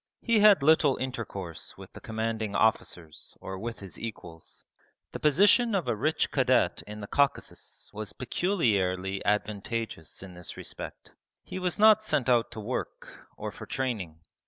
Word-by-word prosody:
He 230 -3 +3
had 205 -7 +7
little 150 -2 +5
intercourse 110 -9 -5
with - - -12
the - - -11
commanding 110 -2 -2
officers 90 -7 -1
or 95 0 -6
with 115 +2 -5
his 95 -2 -8
equals. 90 -8 -8 0.5
The - - -6
position 205 - +4
of 175 -8 0
a 120 - +1
rich 155 +9 0
cadet - - +2
in 105 0 -7
the 100 - -6
Caucasus 140 +3 -1
was 105 -3 -5
peculiarly 100 - 0
advantageous 105 -3 -2
in 95 -2 -10
this 90 -1 -8
respect. - - -8 0.3
He - - -6
was 180 -2 -1
not 215 0 +7
sent 135 - 0
out 120 -2 +3
to 110 - -7
work, 115 +4 -6
or - - -4
for - - -10
training. 105 -12 -3
115 Hz, 155 wpm, -28 LUFS, 100-145 Hz, 0.5 s, had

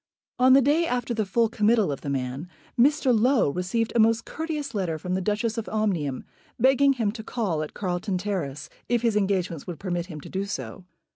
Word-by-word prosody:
On 255 +1 +6
the 270 0 +6
day 310 +5 +3
after 245 -3 -1
the 215 -3 -1
full 230 +4 +2
committal 215 -4 +2
of 140 - -5
the 140 - -5
man, 135 +4 -3 0.3
Mr. 265 0 +4
Low 235 - +3
received 190 +7 -1
a - - +3
most 225 0 +3
courteous 305 -4 -4
letter 180 -6 -1
from 180 +4 -4
the 190 - 0
Duchess 215 +4 -1
of 220 - -6
Omnium, 180 -11 -1 0.4
begging 270 +3 +5
him 225 -6 0
to 220 0 -8
call 200 -10 -2
in 155 - -4
Carlton 185 0 -2
Terrace 180 -8 -3 0.2
if 240 -1 +1
his 230 -3 +2
engagements 190 -6 -1
would 175 -3 -5
permit 175 -2 -3
him 160 -5 -8
to - - -10
do 195 +1 -2
so. 195 -2 -6
210 Hz, 205 wpm, -25 LUFS, 180-235 Hz, 0.4 s, On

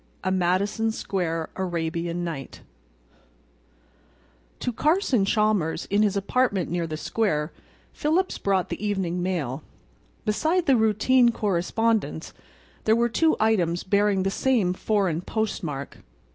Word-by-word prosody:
A 185 - 0
MADISON 190 +5 +1
SQUARE 165 -6 -2
ARABIAN 170 -1 -2
NIGHT 160 -6 -6 2.0
To 245 - -1
Carson 295 - +2
Chalmers, 205 -6 +1
in 205 +1 +3
his 205 -2 +2
apartment 200 -3 0
near 170 -1 -1
the 155 -1 -4
square, 155 -5 -1 0.4
Phillips 335 +5 0
brought 195 -2 0
the - - -5
evening 190 -4 -1
mail. 160 -7 -2 0.6
Beside 320 +11 +1
the 275 - +5
routine 230 +3 +4
correspondence 215 +2 -1 0.5
there 220 - +4
were 235 +1 +2
two 320 +7 +2
items 180 -6 +1
bearing 200 0 +2
the 195 - 0
same 220 -7 +1
foreign 190 -4 0
postmark. 175 -10 -3
200 Hz, 115 wpm, -25 LUFS, 175-225 Hz, 2.0 s, the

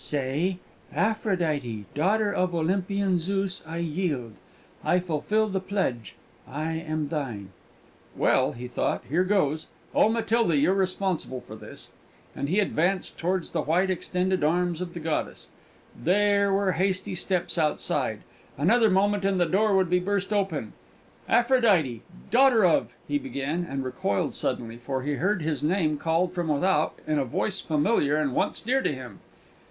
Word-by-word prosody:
"Say, 150 +6 -1 0.4
'Aphrodite, 165 - 0
daughter 205 +7 +1
of 180 -2 0
Olympian 185 +2 +1
Zeus, 195 +2 -2
I 165 +1 -5
yield; 155 - -2 0.5
I 180 - +3
fulfil 180 +6 0
the 195 -2 -1
pledge; 185 - -2 0.3
I 155 +4 -3
am 155 -2 -3
thine!'" 120 - -4 0.7
"Well," 130 +3 +3
he 125 0 -7
thought, 125 - -1
"here 170 +7 +2
goes. 160 -6 +1 0.3
Oh, - - +4
Matilda, 225 -6 +2
you're 150 +7 +3
responsible 185 -8 -1
for - - -11
this!" - - -7 0.4
And 140 - -3
he 190 +5 +2
advanced 185 -1 0
towards 180 +1 -1
the - - 0
white 180 +5 +1
extended 185 0 -1
arms 175 +2 +1
of 175 -1 -5
the - - -4
goddess. 160 -1 -3 0.5
There 200 +2 +2
were 195 -1 +2
hasty 190 +2 0
steps 180 -1 -1
outside; 150 -2 0 0.4
another 220 - +4
moment 200 +1 +2
and 195 -1 +1
the 175 - +4
door 200 +5 +2
would 185 -2 +2
be 180 - +4
burst 200 +2 -1
open. 180 - -1 0.6
"Aphrodite, 215 - +3 0.3
daughter 245 -4 +5
of 120 -8 +2
" - - -31
he 290 - 0
began, 175 - -3
and 135 0 -3
recoiled 125 -6 -1
suddenly; 115 -1 -3
for 130 +2 -4
he 145 +1 -1
heard 185 +4 0
his 155 -2 -1
name 155 -2 +1
called 170 +2 +1
from 175 -2 -2
without 155 +1 +1
in 155 -1 +1
a - - +2
voice 190 - -1
familiar 150 -1 +2
and 150 -4 0
once - - 0
dear 260 +4 +1
to - - 0
him. 130 -3 -8
175 Hz, 155 wpm, -26 LUFS, 150-195 Hz, 0.7 s, daughter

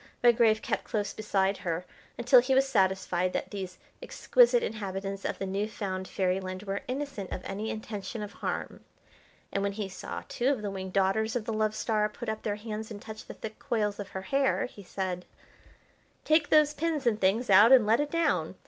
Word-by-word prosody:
Redgrave 230 -2 +5
kept - - -2
close 205 -2 -2
beside 195 -2 0
her 170 0 -3 0.3
until 245 +1 +6
he 260 +2 +1
was 270 +1 +4
satisfied 190 -5 +1
that - - -3
these 190 -3 -6 0.2
exquisite - - +3
inhabitants 195 - -4
of - - -2
the 195 - -3
new 195 +2 -1
found 190 -3 -4
fairyland 185 0 -2
were 195 -1 -3
innocent 260 -7 -4
of 185 - -5
any 205 +3 -4
intention 215 0 -5
of 205 - -8
harm, - - -4 0.7
and 195 - 0
when 200 0 -1
he 205 -1 -3
saw 185 - -7
two 245 - -1
of 270 -6 +1
the 205 - -2
winged 190 -1 -6
daughters 205 +4 +1
of 235 -3 -1
the 225 - -2
Love 215 0 0
Star 215 -1 +1
put 225 +2 -6
up 220 0 -3
their 205 -2 -2
hands 215 0 -6
and 210 -2 -7
touch 220 +1 -9
the - - -8
thick 220 0 -8
coils 210 -3 -1
of 200 - -5
her 190 - -6
hair, 275 +6 +1
he 215 - -11
said: 185 -1 -4 1.0
"Take 310 -1 +3
those 305 -1 +5
pins 310 -3 -1
and 220 -2 +1
things 200 +4 +2
out 205 +5 +8
and 255 -5 +8
let 225 +4 +4
it 295 0 0
down. 335 +1 0
210 Hz, 200 wpm, -29 LUFS, 195-240 Hz, 1.0 s, out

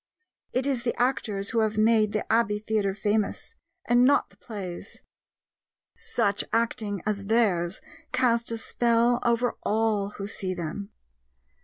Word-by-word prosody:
It 255 +1 0
is 270 -4 0
the 240 0 -2
actors 220 -6 0
who 230 - +1
have 215 -1 +1
made 215 -1 +4
the 215 - -2
Abbey 225 -2 +2
Theatre 210 -2 -1
famous, 210 - -1 0.3
and 240 +1 +4
not 285 +3 +3
the - - -23
plays. 190 -6 -7 0.9
Such 205 -3 -1
acting 220 -4 -1
as 200 -2 -2
theirs 195 -6 +1 0.3
cast 240 -2 +2
a 230 - -2
spell 235 +1 +2
over 235 +1 +1
all 215 -2 +1
who 200 - -4
see 190 -2 -3
them. 180 +4 -5
220 Hz, 140 wpm, -26 LUFS, 200-235 Hz, 0.9 s, made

